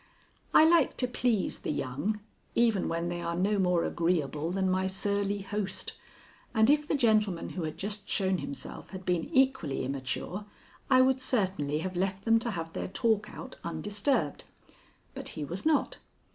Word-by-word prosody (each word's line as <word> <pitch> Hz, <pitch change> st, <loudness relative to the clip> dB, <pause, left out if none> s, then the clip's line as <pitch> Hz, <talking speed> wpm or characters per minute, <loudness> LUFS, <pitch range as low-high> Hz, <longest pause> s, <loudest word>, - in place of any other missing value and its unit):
I 310 Hz, -, +7 dB
like 330 Hz, -3 st, +4 dB
to 250 Hz, -, +1 dB
please 240 Hz, -4 st, 0 dB
the -, -, -5 dB
young 150 Hz, +10 st, -2 dB, 0.3 s
even 225 Hz, -5 st, +3 dB
when 170 Hz, +1 st, -1 dB
they 175 Hz, 0 st, -3 dB
are 170 Hz, 0 st, -2 dB
no 200 Hz, +3 st, +1 dB
more 180 Hz, -2 st, +3 dB
agreeable 160 Hz, -3 st, 0 dB
than 190 Hz, +1 st, 0 dB
my 185 Hz, 0 st, +1 dB
surly 200 Hz, +1 st, -1 dB
host, 200 Hz, 0 st, -3 dB, 0.6 s
and 220 Hz, +4 st, +6 dB
if 300 Hz, 0 st, +2 dB
the -, -, +1 dB
gentleman 215 Hz, -8 st, +2 dB
who 185 Hz, -, -5 dB
had 155 Hz, -, -5 dB
just 205 Hz, 0 st, -4 dB
shown 190 Hz, -2 st, +1 dB
himself 140 Hz, -, -7 dB
had 190 Hz, -1 st, -8 dB
been 175 Hz, -2 st, +1 dB
equally 265 Hz, -, +1 dB
immature, 140 Hz, +9 st, -4 dB, 0.4 s
I 255 Hz, -1 st, +7 dB
would 260 Hz, 0 st, +3 dB
certainly 190 Hz, -, 0 dB
have 185 Hz, -1 st, -4 dB
left 190 Hz, +1 st, -1 dB
them 225 Hz, 0 st, +5 dB
to 235 Hz, +1 st, -3 dB
have 165 Hz, -5 st, -4 dB
their -, -, -3 dB
talk 210 Hz, +1 st, +1 dB
out 260 Hz, -, -9 dB
undisturbed. 200 Hz, -, -1 dB, 0.7 s
But -, -, -6 dB
he 150 Hz, -, -2 dB
was 180 Hz, -, -3 dB
not. 310 Hz, -3 st, +2 dB
195 Hz, 170 wpm, -30 LUFS, 170-225 Hz, 0.7 s, I